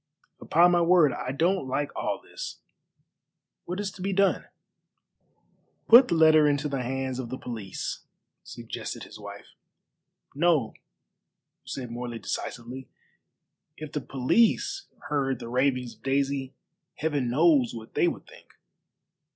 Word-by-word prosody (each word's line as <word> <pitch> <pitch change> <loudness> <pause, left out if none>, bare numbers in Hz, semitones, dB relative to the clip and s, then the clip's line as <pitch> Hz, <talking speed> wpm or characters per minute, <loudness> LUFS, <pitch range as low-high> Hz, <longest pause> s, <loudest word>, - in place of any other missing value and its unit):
"Upon 175 +3 +4
my 175 -1 +3
word, 170 -4 +5
I 125 - -4
don't 170 +2 +1
like 145 +2 -2
all - - -2
this. - - -8 1.1
What 180 +2 -4
is 205 -1 -2
to 185 - -12
be 195 +1 -1
done?" 195 0 +2 1.4
"Put 245 +3 +9
the 170 - 0
letter 155 -2 +6
into 145 0 +1
the 140 -2 -2
hands 130 +1 -3
of 125 -3 -5
the 130 - -4
police," 110 -8 -5 0.4
suggested - - -7
his - - -12
wife. - - -10 0.8
"No," 150 -6 +2 0.9
said 125 -3 -6
Morley 120 0 -5
decisively; 125 +3 -6 0.9
"if 155 -1 -8
the 150 - -3
police 225 - +1 0.2
heard 135 -3 0
the 115 - -8
ravings 125 -1 0
of - - -25
Daisy, 135 0 -1 0.4
Heaven 145 -5 -1
knows 140 -3 +3
what 110 -1 -10
they - - +3
would - - -3
think." - - -17
140 Hz, 135 wpm, -27 LUFS, 125-170 Hz, 1.4 s, Put